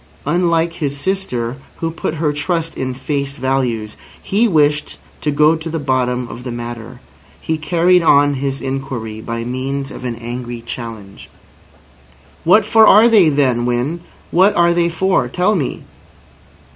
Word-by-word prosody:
Unlike 170 -1 +1
his 145 -4 -3
sister, 140 -10 -2 0.2
who 165 0 -3
put 160 0 -4
her 150 -2 0
trust 165 +2 -2
in 130 -1 -3
face 140 +1 -3
values, 125 -5 -1 0.2
he 215 +4 +1
wished 150 -5 +1 0.2
to 150 - -1
go 150 +2 +4
to 160 +1 -6
the 165 - -3
bottom 125 -3 -1
of 120 +1 -9
the 125 - -5
matter. 120 +1 -7 0.4
He 160 -1 -2
carried 175 +3 +3
on 145 -3 +4
his 135 0 -3
inquiry 130 -5 -4
by 115 +1 -4
means 135 +3 -4
of - - -9
an 120 -2 -3
angry 120 0 -6
challenge. 115 -5 -8 1.1
"What 200 +5 +5
for 220 0 +5
are 215 +3 +7
they 200 -8 +5
then, 130 -5 +1
Winn? 125 +8 -1 0.3
What 190 +4 +4
are 170 0 +4
they 170 0 +1
for? 190 +3 +1
Tell 185 +4 +1
me." 150 -8 -3
140 Hz, 155 wpm, -17 LUFS, 125-170 Hz, 1.1 s, are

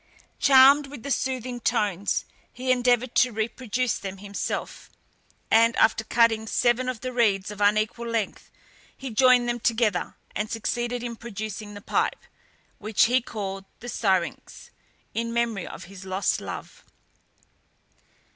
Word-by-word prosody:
Charmed 275 +1 +7
with 275 -4 -10
the 280 - -4
soothing 255 -1 -2
tones, 205 -5 0 0.3
he 255 +1 -2
endeavoured 245 -1 +2
to 250 - +4
reproduce 235 +2 -2
them 195 -1 -6
himself, 200 +1 -5 0.6
and 230 +1 +5
after 220 0 +3
cutting 225 -1 +2
seven 245 +3 +1
of 250 -3 -5
the 255 0 -4
reeds 210 -5 +1
of 210 0 -8
unequal 215 +3 +1
length, 230 -3 -3 0.5
he 270 -2 -6
joined 250 +1 +5
them 240 0 -1
together, 220 -5 0 0.2
and 210 +1 -2
succeeded 240 +2 -2
in 235 -1 -4
producing 215 -2 -6
the 205 - -9
pipe, - - -1 0.6
which 215 0 +2
he 250 +3 +3
called 195 -4 -5
the 245 - -8
syrinx, 190 -7 -2 0.4
in 230 0 -2
memory 230 -5 -1
of - - -9
his 195 +1 -11
lost 190 +1 -1
love. - - -8
230 Hz, 135 wpm, -25 LUFS, 210-245 Hz, 0.6 s, Charmed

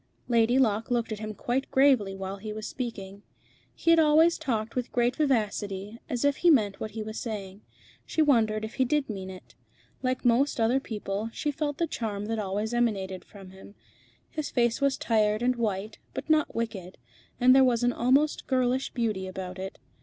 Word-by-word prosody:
Lady 235 +1 +3
Locke 220 -4 +2
looked 235 -2 0
at 215 - -4
him 215 -1 -5
quite 255 +5 -2
gravely 260 -8 +3
while 195 +1 -5
he 215 +2 -7
was 215 0 -6
speaking. 200 -6 -6 0.5
He 335 0 +4
always 320 +2 +5
talked 230 -7 -2
with 250 -1 -2
great 245 0 +1
vivacity, 210 -8 -1
and 230 +2 -12
as 245 +2 -1
if 285 -1 +2
he 350 - +4
meant 215 -10 +3
what 220 - -4
he 220 - -2
was 220 +1 -6
saying. 205 -3 -6 0.4
She - - -5
wondered 220 -8 +3
if 220 - -8
he 260 - +1
did 275 -1 0
mean 190 -2 -6
it. 185 -1 -12 0.5
Like 255 -1 -2
most 245 +3 +3
other 230 +4 +3
people, 210 -3 -4
she 295 - -2
felt 290 0 -3
the 335 - +1
charm 210 -9 -4
that 225 +1 -2
always 210 +3 -2
emanated 195 -6 -1
from 195 -2 -13
him. 190 +2 -14 0.6
His 310 -2 -3
face 235 0 +1
was 275 -1 +2
tired 215 -1 +1
and 250 +1 +2
white, 215 -2 -3 0.2
but - - -3
not 310 -1 +2
wicked, 200 -6 -4 0.4
and 255 +1 +6
there 265 - +7
was 245 -2 +2
an 245 0 +2
almost 275 +5 +2
girlish 255 0 +1
beauty 215 -6 -1
about 185 0 -6
it. 190 +1 -6
230 Hz, 190 wpm, -27 LUFS, 205-260 Hz, 0.6 s, there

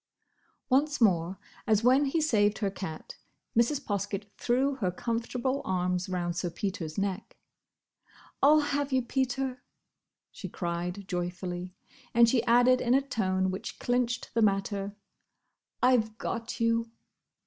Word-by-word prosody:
Once 290 +3 +2
more, 185 -4 +2 0.3
as 215 -1 +3
when 260 +4 +5
he 280 +4 0
saved 215 -9 +2
her 200 -3 -1
cat, 160 -5 -7 0.4
Mrs. 235 +5 +3
Poskett 200 0 -3
threw 260 +4 +1
her 195 -8 0
comfortable 240 +6 -2
arms 180 0 -1
round 175 -2 -2
Sir 175 0 -2
Peter's 170 -4 -4
neck. 195 0 -3 1.0
"I 275 - +6
'll 305 +1 +7
have 285 -1 -1
you, 260 -1 +2
Peter," 260 0 -1 0.7
she - - -8
cried 175 +2 -4
joyfully; 180 0 -4 0.4
and 235 0 +7
she 230 0 +2
added 245 +2 +5
in 245 +1 +3
a 270 - +4
tone 190 -6 0
which 190 - -6
clinched 245 0 -1
the 230 - +2
matter, 200 -1 0 0.9
"I've 225 -4 +3
got 235 +2 -4
you!" 230 0 +1
220 Hz, 135 wpm, -29 LUFS, 185-250 Hz, 1.0 s, ll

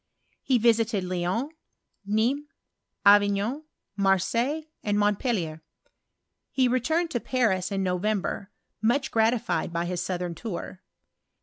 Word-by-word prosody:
He 260 - +2
visited 225 -3 +2
Lyons, 185 - -1 0.6
Nismes, 245 +8 +1 0.6
Avignon, 205 +7 +4 0.3
Marseilles, 200 - +1 0.2
and 205 -1 0
Montpellier. 205 - 0 0.9
He 260 -2 +2
returned 315 +8 +1
to 240 - 0
Paris 215 -8 0
in 195 -1 0
November, 190 +1 -1 0.3
much 245 +5 +1
gratified 225 -4 +1
by 170 0 -1
his 175 0 -2
southern 180 -2 -3
tour. 185 -1 -6
210 Hz, 105 wpm, -26 LUFS, 185-245 Hz, 0.9 s, Avignon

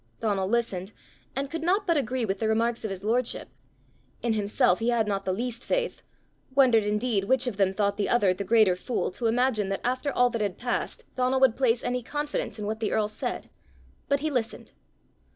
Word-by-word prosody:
Donal 200 -4 0
listened, 205 -4 -1 0.4
and 275 +1 -1
could 330 - -3
not 380 +5 +1
but 340 -3 +2
agree 255 -3 0
with 195 -1 -2
the 220 - 0
remarks 230 +2 +1
of 220 - -2
his 195 0 -6
lordship. 235 +3 0 0.7
In 235 -2 +1
himself 210 -1 +2
he 230 +1 0
had 230 -3 +2
not 195 -1 -2
the 185 - 0
least 240 +4 -3
faith - - -1 0.5
wondered 250 -5 +5
indeed 210 -1 0
which 260 +5 +2
of 240 -6 -3
them 195 -2 +3
thought 200 0 0
the 205 - 0
other 205 -6 +4
the 200 - -4
greater 215 -3 +4
fool 225 +4 -2
to 230 +5 -2
imagine 225 -3 +1
that 195 - -2
after 255 +3 -1
all 245 -1 +3
that 230 -2 -2
had 200 -3 -1
passed 245 0 -3
Donal 255 +1 +1
would 260 -4 +5
place 245 -3 +2
any 250 0 -1
confidence 295 +3 -3
in 210 - -5
what 215 +1 -3
the 220 - -1
earl 215 -1 +1
said; 215 - -5 0.6
but 280 0 +2
he 310 0 -1
listened. 230 -5 -3
230 Hz, 205 wpm, -27 LUFS, 205-255 Hz, 0.7 s, wondered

